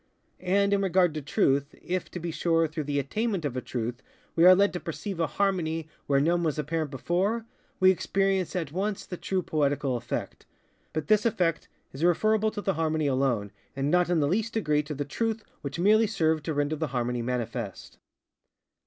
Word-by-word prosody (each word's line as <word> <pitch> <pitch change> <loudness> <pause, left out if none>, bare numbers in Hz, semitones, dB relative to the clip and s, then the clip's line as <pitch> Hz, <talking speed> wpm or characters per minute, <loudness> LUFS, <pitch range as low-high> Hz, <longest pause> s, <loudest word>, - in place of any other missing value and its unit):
And 200 +2 +2
in 200 - +2
regard 185 -3 +3
to 155 - -4
Truth, 140 0 +1
if, 185 +1 -3
to 180 - -6
be 170 0 -4
sure, 165 0 +2
through 155 -1 -4
the 145 0 -1
attainment 195 - -1
of 135 -3 -2
a 130 - -2
truth 120 0 -4 0.3
we 165 - +5
are 185 0 +10
led 200 +2 +3
to 180 - -3
perceive 175 +3 -5
a 165 - +2
harmony 165 -4 -1 0.2
where 140 -1 +3
none 170 +4 +2
was 155 -3 0
apparent 155 +1 -2
before, 190 - -1 0.3
we 185 0 +7
experience 190 0 0
at 165 -6 -2
once 195 +4 -2
the 180 - -6
true 185 +1 -2
poetical 145 -4 0
effect; 120 +1 -5 0.4
but 155 -1 -3
this 210 +2 +4
effect 175 -8 0 0.3
is 135 +4 -5
referable 215 +5 +3
to 210 - -5
the 195 - 0
harmony 160 -1 0
alone, 130 -7 +1 0.2
and 135 +2 -1
not 180 0 +3
in 175 -2 +2
the 145 - +2
least 220 +7 0
degree 150 -9 +2
to 150 0 -6
the 145 +1 -3
truth 225 +8 -2 0.2
which 140 - -5
merely 215 +5 +4
served 160 -7 0
to 160 - -1
render 145 +2 0
the 160 +1 -1
harmony 125 -2 -1
manifest. 120 -1 -4
165 Hz, 195 wpm, -27 LUFS, 145-190 Hz, 0.4 s, are